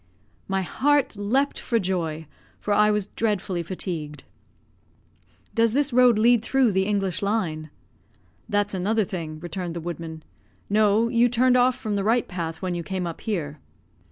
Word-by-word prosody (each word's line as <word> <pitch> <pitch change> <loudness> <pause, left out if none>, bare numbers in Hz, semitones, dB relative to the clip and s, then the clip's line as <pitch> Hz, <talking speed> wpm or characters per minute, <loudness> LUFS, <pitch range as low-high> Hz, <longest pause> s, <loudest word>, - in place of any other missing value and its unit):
My 195 -1 0
heart 285 +6 +1
leaped 245 +8 0
for 235 - 0
joy, 170 -6 -2 0.3
for 210 - -1
I 210 +1 +4
was 210 -2 +1
dreadfully 195 -5 -1
fatigued. 165 -4 -4 1.3
"Does 230 -1 +2
this 285 0 +1
road 250 -2 +5
lead 235 +1 +4
through 255 0 +2
the 190 0 +1
English 195 -3 -1
Line?" 180 -7 -1 0.8
"That's 205 -1 0
another 210 +4 +1
thing," 165 -6 -6
returned 175 0 -5
the - - -3
woodman. 165 -1 -6 0.5
"No, 215 +2 +3
you 240 0 +3
turned 250 +1 +3
off 250 0 +4
from 215 -4 -3
the 200 - -1
right 230 +3 +2
path 170 -1 -5
when 185 -1 -1
you 175 - -3
came 185 +1 -3
up 170 -1 -6
here." 155 -9 -3
200 Hz, 155 wpm, -24 LUFS, 175-230 Hz, 1.3 s, road